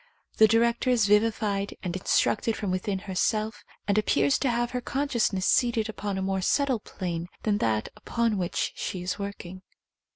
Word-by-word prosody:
The 220 - +7
director 235 +3 +2
is 240 -4 +3
vivified 210 -1 +1
and 180 -2 -3
instructed 215 +4 +1
from 200 -3 -2
within 190 +2 -1
herself, 215 +3 -1 0.2
and 205 +1 +3
appears 140 -9 +2
to 265 - +1
have 240 0 0
her 250 0 -2
consciousness 240 -9 0
seated 230 -3 +2
upon 205 -2 -4
a 190 - -2
more 190 0 -1
subtle 265 +4 +1
plane 175 -4 -5 0.2
th^n 210 -1 +1
that 110 -1 0
upon 230 -4 -1
which 175 -2 -1
she 180 -2 -4
is 180 +2 -3
working. 190 -2 -6
210 Hz, 165 wpm, -27 LUFS, 185-230 Hz, 0.2 s, The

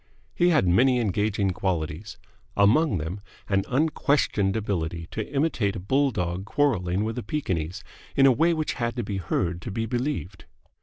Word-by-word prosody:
He 175 0 +3
had 150 - +3
many 125 +8 +4
engaging 105 -2 0
qualities 90 0 -3 0.4
among 105 - +4
them 85 +6 -5 0.3
an 95 -1 +1
unquestioned 140 -8 +1
ability 85 -6 -2
to 110 - -5
imitate 135 -9 0
a - - -4
bulldog 95 -5 0
quarrelling 100 -7 +1
with 110 +3 -3
a - - -5
Pekingese 90 - -3 0.3
in 135 - +5
a 135 - +7
way 165 +7 +3
which 155 -1 -1
had 120 0 -1
to 120 - -2
be 100 -1 -3
heard 85 -1 -1
to - - -6
be 115 +3 -2
believed. 120 -5 -3
105 Hz, 160 wpm, -25 LUFS, 90-130 Hz, 0.4 s, a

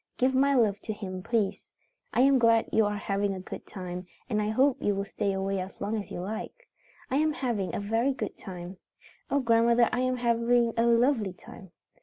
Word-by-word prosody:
Give 255 +1 +2
my 275 +2 +3
love 210 -5 +3
to 215 - -5
him, 185 -3 -6
please. 215 -1 0 0.5
I - - +2
am 270 0 +5
glad 230 -1 +4
you 220 -2 +4
are 205 0 -2
having 200 0 -1
a - - -6
good 185 - -9
time, 180 -1 -7 0.2
and 215 -5 0
I 210 - -1
hope 260 +4 +2
you 205 - +1
will 200 0 -2
stay 200 0 -2
away 195 0 -1
as 185 +1 -7
long 205 +2 -2
as - - -12
you - - -6
like. 220 - -6 0.4
I 265 - +2
am 310 +1 +2
having 235 -9 -2
a - - -1
very 225 +6 +1
good - - -4
time. 180 -1 -8 0.5
Oh, 280 - +2
grandmother, 235 0 +4
I 245 - -1
am 255 0 0
having 235 0 +2
a 230 +1 +2
lovely 235 -4 +3
time. 190 +1 -13
225 Hz, 210 wpm, -28 LUFS, 195-245 Hz, 0.5 s, am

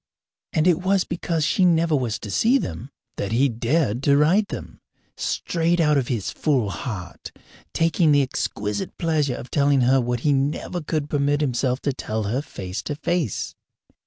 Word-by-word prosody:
And 155 - +1
it 180 -1 +3
was 190 0 +2
because 165 -2 -2
she 185 +3 +2
never 165 -2 +3
was 120 -5 -1
to 105 - -6
see 235 - +3
them 135 - -5 0.3
that 100 - -3
he 135 +4 +3
dared 120 +1 0
to 140 0 +4
write 180 +8 +3
them, - - -8 0.3
straight 170 0 0
out 150 -2 +4
of 135 -4 +1
his 115 -7 -2
full 130 -10 0
heart, 95 -6 -6 0.4
taking 165 -1 +2
the 145 -1 +5
exquisite 105 - -3
pleasure 155 -6 0
of 125 - -9
telling 140 -2 +3
her 130 +2 +4
what 120 -1 -2
he 145 +1 +2
never 145 +6 -1
could 155 -1 -2
permit 145 0 +1
himself 130 -1 0
to 140 - -1
tell 110 -4 -3
her 115 +7 -1
face 95 -6 -6
to 145 - -4
face. 155 - -2
145 Hz, 175 wpm, -23 LUFS, 120-165 Hz, 0.4 s, the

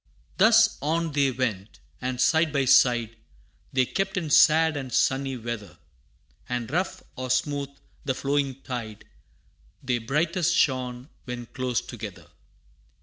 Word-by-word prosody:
Thus 225 0 +5
on 165 +3 -1
they 140 -1 +2
went, 110 -6 -3 0.2
and 125 -1 -3
side 160 +3 +3
by 140 -2 +1
side, 120 -3 +4 0.5
They 130 -1 +2
kept 195 - -2
in 160 -5 -2
sad 160 +1 +5
and 135 -3 -5
sunny 135 +1 +1
weather, 115 -3 -6 0.7
And 120 -1 -3
rough 180 +4 -2
or 130 0 -5
smooth 140 +2 0 0.3
the 130 -2 -1
flowing 140 -1 -1
tide, 115 -4 -6 0.8
They 125 -2 0
brightest 160 +8 0
shone 130 -2 0 0.2
when 125 -1 -6
close 125 -1 -2
together. - - -9
130 Hz, 130 wpm, -26 LUFS, 125-155 Hz, 0.8 s, Thus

